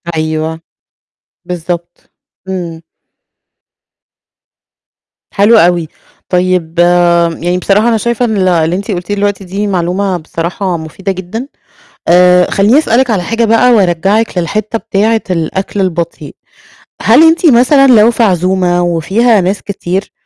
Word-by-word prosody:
أيوه. 160 0 -3 0.9
بالضبط. 175 0 -5 0.5
إمم. 175 -3 -5 2.5
حلو 210 +3 +4
أوي. 175 -4 +2 0.4
طيب، 180 -2 -1 0.6
يعني 175 +2 -1
بصراحة 200 +4 +1
أنا 230 - +1
شايفة 235 +2 -1
إن 220 -3 -2
ال 185 -1 +1
اللي 170 -1 +1
أنتِ 200 +3 -4
قلتيه 180 +2 -3
دلوقتي 205 -1 -2
دي 195 +3 -4
معلومة 185 +1 -1
بصراحة 170 +3 -4
مفيدة 165 +5 -5
جدًا، 190 +7 -6 0.6
آآ، 180 +1 +4
خلّيني 205 +7 +3
أسألِك 255 -3 +1
على 200 -6 0
حاجة 230 +4 -1
بقى 230 +3 +3
وارجَّعِك 195 +2 +1
للحتّة 210 +6 -2
بتاعة 220 +3 0
الأكل 185 +3 -3
البطيء، 170 -2 -4 0.7
هل - - +5
أنتِ 330 +2 +1
مثلًا 275 +1 +4
لو 220 +2 +5
في 235 - -1
عزومة 180 -2 +1
وفيها 195 +7 +1
ناس 190 +3 -2
كتير 190 -1 -4
190 Hz, 120 wpm, -11 LUFS, 175-215 Hz, 2.5 s, هل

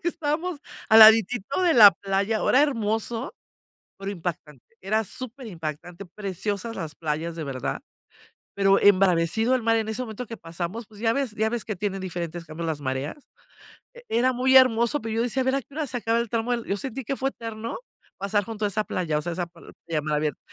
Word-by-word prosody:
Porque 345 - 0
estábamos 325 +1 -2 0.3
al 220 - +8
laditito 225 - +6
de 345 - +4
la 210 -4 +10
playa, 200 +3 0
era 275 - +5
hermoso, 225 -2 -1 0.7
pero 195 0 -4
impactante, 160 -6 -6 0.2
era 215 +3 0
superimpactante, 185 - -7
preciosas 205 +3 -4
las 155 -6 -6
playas, 160 +1 -3
de 165 - -5
verdad, 130 -3 -4 0.7
pero 195 0 +4
embravecido 195 +4 +3
el 255 - +1
mar 225 0 +3
en 220 0 -2
ese 220 +3 -3
momento 240 +1 -6
que 230 - -7
pasamos, 175 +7 -6
pues 210 -1 -16
ya 225 0 +2
ves 275 -4 -1
ya 220 +1 0
ves 240 -1 -3
que 215 - -3
tienen 195 0 -3
diferentes 175 -2 -5
cambios 160 +1 -6
las 150 -2 -3
mareas. 130 +2 -3 0.8
E 485 - -14
era 250 +3 +2
muy 260 +2 +5
hermoso, 235 +1 +4
pero 225 0 -4
yo 230 - +1
decía: 245 +2 0
"A - - -6
ver 260 +1 +2
a 275 - 0
qué 275 - -22
hora 305 -2 -3
se 245 - -3
acaba 230 0 0
el 235 -2 -2
tramo". 230 +1 0
Yo 200 - -1
sentí 265 +2 -5
que 275 - -2
fue 270 0 -1
eterno 230 -2 -6 0.4
pasar 200 +1 0
junto 220 0 -4
a - - +3
esa 215 +2 -1
playa, 165 -7 -2
o - - -1
sea, 175 - -3
esa 175 0 -3
p 170 - -20 0.3
playa 165 - -2
a - - -3
mar 150 0 -1
abierto. 150 -2 -2
215 Hz, 210 wpm, -25 LUFS, 175-240 Hz, 0.8 s, la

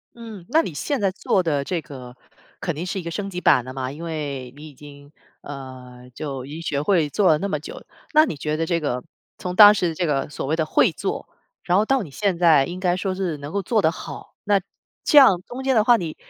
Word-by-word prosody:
嗯， 225 -6 -10
那 315 +6 +4
你 185 - -5
现 280 - -2
在 195 - +2
做 190 0 0
的 150 -5 -1
这 170 +3 -3
个 125 -3 -11 0.5
肯 170 - -2
定 165 +4 -4
是 190 +1 -3
一 - - -7
个 170 - -5
升 195 +4 -4
级 180 -1 -5
版 125 -7 +4
的 130 - -8
嘛， 130 -1 -4
因 150 +4 -9
为 145 -6 -5
你 150 +2 -11
已 - - -16
经， 145 0 -14 0.3
呃， 130 -3 -10
就 135 -2 -6
已 140 - -11
经 160 +2 -7
学 150 -4 -2
会 160 -2 +2
做 195 +6 +1
了 155 - +5
那 195 - -2
么 155 -6 -2
久， 155 - -10 0.3
那 310 0 +7
你 - - -4
觉 150 +2 -2
得 160 - -1
这 170 0 0
个， 125 -5 -3 0.4
从 180 -1 -4
当 210 +1 +10
时 175 -5 -1
这 175 - -1
个 145 -3 -1
所 145 - -5
谓 150 +4 0
的 160 -1 -1
会 - - +3
做， - - -4 0.4
然 175 - +1
后 205 - +4
到 265 +1 +1
你 155 - -11
现 195 +4 -1
在 160 -5 +5
应 180 +1 -6
该 180 -1 +1
说 185 0 -2
是 185 -5 -2
能 145 +1 -8
够 200 +1 -2
做 220 +3 +1
得 160 - +3
好， - - -10
那 200 -1 +2 0.4
这 300 - +3
样 225 -11 +7
中 255 +2 -7
间 265 0 +2
的 215 - +4
话， 240 +1 +5
你 165 -6 -5
165 Hz, 275 characters per minute, -22 LUFS, 145-195 Hz, 0.5 s, 当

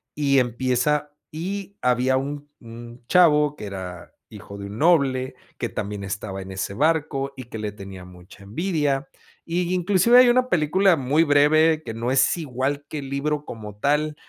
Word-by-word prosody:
Y 140 -2 +3
empieza 130 +4 0 0.2
y 195 +5 -5
había 125 +1 +2
un 145 +2 -5
un 120 +1 -12
chavo 150 -4 +4
que 105 - -8
era 90 -3 -8 0.2
hijo 100 - -11
de 100 - -7
un 105 +3 -8
noble, 140 -6 +2 0.2
que - - -2
también 105 -1 -5
estaba 95 0 -5
en 95 0 -9
ese 95 +1 -4
barco, 140 0 0
y 130 - -8
que 115 -2 -8
le 105 -1 -3
tenía 95 -2 -10
mucha 90 +2 -15
envidia, 145 - -1 0.4
y 175 +1 -1
inclusive 190 +6 +4
hay 250 -1 +8
una 255 +1 +2
película 175 +4 +3
muy 145 +3 +2
breve 155 +2 +4
que 115 - -6
no 115 +2 -3
es 130 -1 +3
igual 140 -1 -3
que 155 - -4
el 135 -1 -7
libro 150 +1 -2
como 105 -2 -9
tal, 150 +4 0
140 Hz, 170 wpm, -23 LUFS, 115-155 Hz, 0.4 s, hay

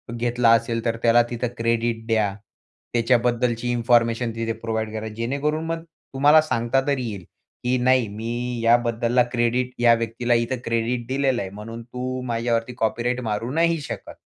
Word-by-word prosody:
घेतला 120 0 +2
असेल, 115 0 +2
तर 115 -1 0
त्याला 120 0 +5
तिथं 120 +1 -2
क्रेडिट 115 0 0
द्या. 110 -3 +1 0.6
त्याच्याबद्दलची 120 0 +1
इन्फॉर्मेशन 115 0 +2
तिथे 115 0 -2
प्रोव्हाईड 110 -1 -2
करा 110 0 -4
जेणेकरून 140 +7 -1
मग 165 0 -3 0.3
तुम्हाला 145 +3 +6
सांगता 130 -3 0
तरी 140 -3 0
येईल 100 -4 -7 0.4
की 125 +1 +1
नाही, 130 -2 +3
मी 120 +4 -4
याबद्दलला 120 +1 +3
क्रेडिट 120 +1 0
या 120 -1 +6
व्यक्तीला 115 +1 -1
इथं 120 +2 0
क्रेडिट 115 +1 -1
दिलेलं 130 -1 0
आहे. 95 - -4
म्हणून 110 +3 -8
तू 125 +2 -5
माझ्यावरती 115 0 -1
कॉपीराइट 120 +2 -1
मारू 115 +1 -3
नाही 165 +2 +2
शकत 140 - -7
120 Hz, 150 wpm, -23 LUFS, 115-125 Hz, 0.6 s, तुम्हाला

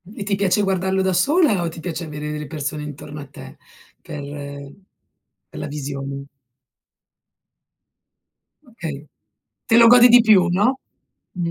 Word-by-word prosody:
E 200 - -5
ti 200 0 -1
piace 200 +1 +1
guardarlo 190 0 0
da 190 - +1
sola 255 - +2
o 170 - -2
ti 160 - -10
piace 170 0 -5
avere 150 -1 -6
delle 150 -1 -5
persone 150 0 -4
intorno 150 0 -9
a 145 - -9
te - - -13 0.4
per 145 -1 -8 1.3
per - - -10
la - - -5
visione? 140 -1 -6 2.4
Okay. 155 - -8 0.6
Te 225 - +3
lo 235 - +8
godi 245 +1 +8
di 245 0 +7
più, 200 -6 +4
no? 210 +9 +1 0.5
Mh. 175 -2 -3
175 Hz, 140 wpm, -21 LUFS, 150-205 Hz, 2.4 s, lo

